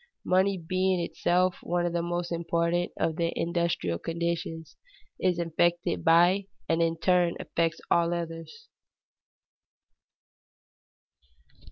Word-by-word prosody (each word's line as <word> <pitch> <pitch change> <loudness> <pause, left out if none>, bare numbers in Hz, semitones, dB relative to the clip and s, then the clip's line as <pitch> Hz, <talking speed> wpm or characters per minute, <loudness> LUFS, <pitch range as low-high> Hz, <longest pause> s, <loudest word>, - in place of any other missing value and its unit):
Money 190 +1 +2
being 185 +2 0
itself 180 +1 0
one 175 0 -1
of 175 - -1
the 170 - 0
most 175 0 -3
important 170 +1 0
of 160 -1 -1
the 170 -1 0
industrial 170 - -1
conditions, 165 -1 -3 0.4
is 180 -2 +1
affected 170 +1 0
by 175 +4 +4 0.2
and 165 0 +1
in 165 0 +1
turn 175 0 +2
affects 165 -1 -1
all 170 0 +3
others. 165 -2 -6
170 Hz, 110 wpm, -28 LUFS, 165-175 Hz, 0.4 s, by